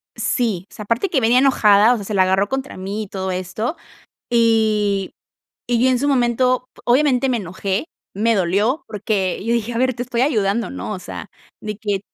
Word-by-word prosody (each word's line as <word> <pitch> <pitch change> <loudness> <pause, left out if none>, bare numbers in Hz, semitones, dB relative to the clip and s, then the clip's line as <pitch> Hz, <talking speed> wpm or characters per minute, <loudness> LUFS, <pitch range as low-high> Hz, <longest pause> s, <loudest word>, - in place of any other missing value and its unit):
Sí, 210 -7 -1
o - - -20
sea, 210 - -7
aparte 230 - 0
que 295 - +2
venía 240 +2 +4
enojada, 225 -4 +5
o - - +1
sea, 205 - -7
se 215 - -5
la 195 - +3
agarró 190 +2 +2
contra 270 +4 -4
mí 200 +3 -4
y - - -9
todo 190 -1 -4
esto, 200 - -3 0.5
y 215 -4 +2 0.6
y 240 -1 +2
yo 260 - +4
en 250 - +2
su 285 +3 0
momento, 250 -1 +2 0.2
obviamente 260 0 +3
me 250 - +1
enojé, 195 - -3 0.3
me 225 +3 +2
dolió, 205 - +1
porque 200 -3 -2
yo 230 - 0
dije: 235 0 -1
"A 230 - -2
ver, 255 0 +1
te 240 - -4
estoy 245 -1 -1
ayudando, 220 -5 +1
¿no?, 270 - -5
o - - -5
sea, - - -8 0.3
de 210 -1 -5
que 205 -2 -2
225 Hz, 205 wpm, -20 LUFS, 200-250 Hz, 0.6 s, enojada